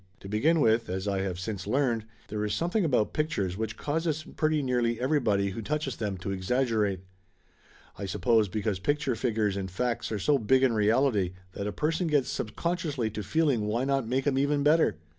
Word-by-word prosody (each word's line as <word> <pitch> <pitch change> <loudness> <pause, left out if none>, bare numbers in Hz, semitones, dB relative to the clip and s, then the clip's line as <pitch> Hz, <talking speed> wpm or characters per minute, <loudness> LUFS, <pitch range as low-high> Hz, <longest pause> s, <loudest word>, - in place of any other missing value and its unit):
To - - -9
begin 150 +11 +2
with, 115 -4 +3
as 95 +2 -3
I 100 -1 0
have 95 -2 -3
since 100 -1 -5
learned, 120 -2 +1 0.2
there 105 0 -2
is 105 -1 -1
something 175 - 0
about 125 -9 +1
pictures 105 - -1
which 110 +1 -4
causes 155 +1 -1
pretty 155 -1 +1
nearly 120 -3 0
everybody 120 -8 +1
who 105 - -5
touches 145 +1 -2
them 100 -4 -3
to 95 +2 -4
exaggerate. 105 -1 0 1.0
I 100 - -3
suppose 110 +2 +2
because 100 0 -2
pic 145 +9 +1
ture 145 -4 -1
figures 110 -4 0
and 95 -1 -3
facts 120 +6 -2
are 110 - -1
so 140 +8 +2
big 130 +4 +3
in 130 -3 +4
reality 110 -3 +2 0.2
that 100 +2 -4
a - - -2
person 160 - -1
gets 145 -4 +1
subconsciously 145 - -2
to 105 0 -4
feeling 140 -5 +1
why 115 +4 0
not 135 -3 0
make 130 +3 0
'em 135 -2 +2
even 145 +1 +1
better? 155 - +4
115 Hz, 195 wpm, -28 LUFS, 105-145 Hz, 1.0 s, in